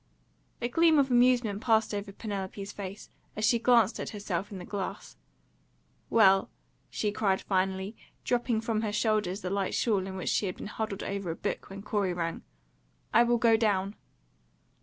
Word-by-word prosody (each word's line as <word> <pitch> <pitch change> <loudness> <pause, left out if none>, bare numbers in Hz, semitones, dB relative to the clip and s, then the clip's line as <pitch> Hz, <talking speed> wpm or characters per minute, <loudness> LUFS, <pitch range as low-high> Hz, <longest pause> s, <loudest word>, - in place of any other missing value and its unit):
A - - +2
gleam 325 +5 +4
of 270 -2 +3
amusement 240 -4 +3
passed 220 -2 +2
over 205 0 -4
Penelope's 200 -1 -5
face, 200 0 -8 0.2
as 215 - 0
she 235 +2 +3
glanced 230 -3 +4
at - - -4
herself 200 -2 -4
in 200 - -6
the 180 - -8
glass. 195 -3 -5 0.9
"Well," 195 -4 +5 0.4
she 210 - -1
cried 200 -2 +1
finally, 190 +2 -1 0.3
dropping 240 -2 0
from 225 -1 -1
her 215 -2 -1
shoulders 210 -3 0
the 185 - -4
light 195 -1 -1
shawl 200 -5 +1
in 190 - -6
which 185 - -3
she 205 - +1
had 185 - -4
been - - -7
huddled 210 -1 -4
over 195 -2 -3
a 165 - -2
book - - -4
when 195 +1 -8
Corey 205 -3 0
rang, 165 -1 -3 0.7
"I - - +7
will 240 0 +3
go 230 -1 +4
down." 205 -3 +1
205 Hz, 175 wpm, -29 LUFS, 195-225 Hz, 0.9 s, I